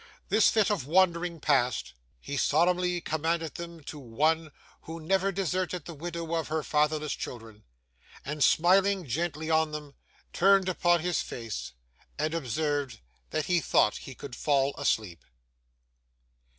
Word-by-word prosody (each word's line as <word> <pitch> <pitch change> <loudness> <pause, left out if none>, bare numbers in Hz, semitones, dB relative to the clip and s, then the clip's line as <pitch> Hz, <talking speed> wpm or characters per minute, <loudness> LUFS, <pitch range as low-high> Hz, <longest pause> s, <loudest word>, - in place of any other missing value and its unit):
This 215 +3 +5
fit 220 0 +2
of 160 -11 -2
wandering 175 0 +2
past, 125 - +1 0.3
he 145 - -6
solemnly 175 +4 +2
commended 160 0 -1
them 170 -2 -8
to 150 +1 -8
One 155 +6 0 0.3
who 165 +1 -7
never 195 +4 +1
deserted 185 -2 -2
the 170 - -7
widow 170 +2 -5
or 165 0 -1
her 155 0 -2
fatherless 150 0 +1
children, 110 -3 -8 0.6
and, 150 0 -1
smiling 190 +2 +4
gently 160 +3 -2
on 160 -1 +2
them, 150 -2 -7 0.4
turned 195 0 +4
upon 175 -2 +2
his 175 +1 0
face, 115 - -6 0.4
and 155 +1 -1
observed, 145 -2 -2 0.3
that 155 -1 -1
he 180 -1 +2
thought 105 - +2
he 135 - -10
could 125 -1 -8
fall 140 +1 +1
asleep. 110 - -1
160 Hz, 135 wpm, -28 LUFS, 145-175 Hz, 0.6 s, This